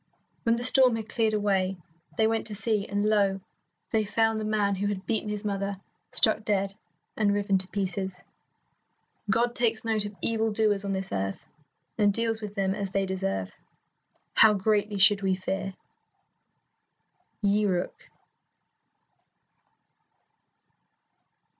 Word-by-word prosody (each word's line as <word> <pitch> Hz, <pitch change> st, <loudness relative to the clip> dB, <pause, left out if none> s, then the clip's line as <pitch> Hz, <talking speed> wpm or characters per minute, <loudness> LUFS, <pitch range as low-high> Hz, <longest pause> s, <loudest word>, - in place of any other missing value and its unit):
When 230 Hz, 0 st, +2 dB
the 240 Hz, -, -3 dB
storm 255 Hz, -1 st, +6 dB
had 220 Hz, -1 st, -5 dB
cleared 220 Hz, -2 st, +1 dB
away, 195 Hz, -2 st, 0 dB, 0.4 s
they 220 Hz, -, +3 dB
went 225 Hz, 0 st, 0 dB
to 210 Hz, -, -5 dB
see, 210 Hz, -1 st, 0 dB
and 205 Hz, +1 st, -1 dB
lo, 200 Hz, -2 st, +2 dB, 0.5 s
they 220 Hz, -1 st, +2 dB
found 225 Hz, +1 st, +1 dB
the -, -, -3 dB
man 210 Hz, -2 st, +1 dB
who 200 Hz, +1 st, -2 dB
had 200 Hz, -1 st, -4 dB
beaten 220 Hz, -2 st, -2 dB
his 210 Hz, 0 st, -4 dB
mother 200 Hz, -1 st, -2 dB, 0.3 s
struck 220 Hz, 0 st, +4 dB
dead 195 Hz, -2 st, 0 dB, 0.4 s
and 210 Hz, -2 st, +2 dB
riven 200 Hz, -2 st, +1 dB
to 185 Hz, -, -1 dB
pieces. 190 Hz, -1 st, -3 dB, 1.1 s
God 235 Hz, +3 st, +2 dB
takes 230 Hz, -2 st, -1 dB
note 220 Hz, -2 st, 0 dB
of 205 Hz, 0 st, -7 dB
evil 225 Hz, -1 st, 0 dB
doers 210 Hz, -2 st, +1 dB
on 200 Hz, -1 st, -2 dB
this 190 Hz, 0 st, -4 dB
earth, 95 Hz, 0 st, -3 dB, 0.5 s
and 205 Hz, -1 st, +4 dB
deals 225 Hz, +1 st, -1 dB
with 210 Hz, -1 st, -7 dB
them 190 Hz, -1 st, 0 dB
as 200 Hz, -1 st, -4 dB
they 195 Hz, +1 st, 0 dB
deserve. 95 Hz, -, -3 dB, 0.8 s
How 220 Hz, -1 st, +6 dB
greatly 205 Hz, +1 st, 0 dB
should 200 Hz, +1 st, +5 dB
we 190 Hz, -1 st, +1 dB
fear! 190 Hz, +1 st, -4 dB, 1.7 s
Yi 205 Hz, +1 st, +2 dB
Ryuk. 180 Hz, -2 st, -3 dB
205 Hz, 140 wpm, -27 LUFS, 195-220 Hz, 1.7 s, storm